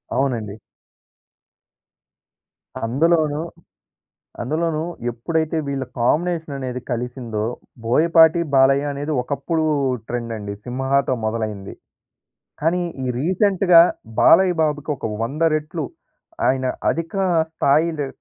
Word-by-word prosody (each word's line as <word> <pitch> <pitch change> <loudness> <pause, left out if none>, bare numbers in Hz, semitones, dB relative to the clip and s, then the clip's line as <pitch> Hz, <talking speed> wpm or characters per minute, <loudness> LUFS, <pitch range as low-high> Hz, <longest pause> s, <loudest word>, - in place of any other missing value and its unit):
అవునండి. 115 -7 -1 2.3
అందులోనూ 155 +4 +2 1.0
అందులోనూ 155 +5 -1 0.3
ఎప్పుడైతే 160 +7 -2
వీళ్ళ 135 -1 -2
కాంబినేషన్ 160 +5 0
అనేది 125 -1 -4
కలిసిందో 120 -3 -3 0.4
బోయపాటి, 160 +6 +5
బాలయ్య 135 +2 +4
అనేది 145 +2 -4
ఒకప్పుడు 150 +4 -2 0.4
ట్రెండ్ 120 -1 -3
అండి 100 -1 -6
'సింహా'తో 135 +1 0
మొదలైంది. 110 -3 -3 0.9
కానీ, 170 +4 +1 0.2
ఈ - - -2
రీసెంట్‌గా 185 +1 +5 0.4
బాలయ్య 180 +1 +6
బాబుకి 150 -1 -1
ఒక, - - -11 0.2
100 145 +8 -3
రెట్లు 155 +1 -3 0.6
ఆయన 130 0 +1 0.2
అధిక 165 +4 -2 0.4
స్థాయి 160 +1 +2
లె 145 - -1
145 Hz, 90 wpm, -21 LUFS, 125-165 Hz, 2.3 s, బాలయ్య